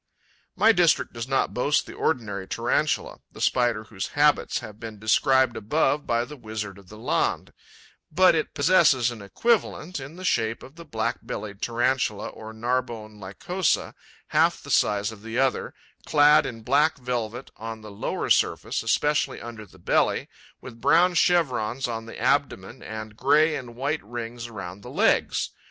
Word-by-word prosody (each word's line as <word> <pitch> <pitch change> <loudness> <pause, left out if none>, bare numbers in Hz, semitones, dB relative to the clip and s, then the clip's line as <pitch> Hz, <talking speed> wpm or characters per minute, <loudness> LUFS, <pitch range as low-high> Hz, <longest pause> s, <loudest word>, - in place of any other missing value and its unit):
My 225 - +5
district 175 -6 +2
does 115 +1 -5
not 135 0 0
boast 145 +4 +1
the - - -10
ordinary 100 -9 -2
Tarantula, - - -1
the - - -13
Spider 120 -4 +1
whose 105 -3 -5
habits 150 0 +3
have 105 0 -8
been 110 -2 -8
described 130 +3 +3
above 145 +6 0
by 120 0 +1
the 150 - -10
Wizard 110 -5 -6
of 95 - -18
the 105 - -11
Landes; 110 - -1 0.6
but 185 +4 +5
it 155 -2 -2
possesses 145 -7 +4
an 115 -3 -9
equivalent 185 - 0
in 140 +4 -9
the 185 - -9
shape 115 -7 0
of 135 - -12
the 170 0 -11
Black 115 -3 -2
bellied 100 -1 -7
Tarantula, 120 -2 0
or 110 0 -10
Narbonne 110 -2 -3
Lycosa, 160 - -1 0.4
half - - +2
the - - -7
size 105 +1 +2
of 110 -2 -12
the 115 +2 -5
other, 130 0 +1 0.3
clad 150 0 +5
in 115 -2 -8
black 145 +6 +3
velvet 125 -1 -4
on 115 0 -7
the 105 -1 -10
lower 100 - -3
surface, - - +1
especially 150 0 +1
under 115 -2 -9
the 95 - -19
belly, 85 - +1 0.3
with 115 -2 -11
brown 170 +7 +4
chevrons 135 -9 +1
on 115 -1 -5
the - - -9
abdomen - - 0
and 110 -1 -7
grey 150 +6 +3
and 120 -3 -7
white 140 +5 -2
rings 120 +2 -6
around 100 -4 -8
the - - -10
legs. - - +1
120 Hz, 165 wpm, -25 LUFS, 110-145 Hz, 0.6 s, My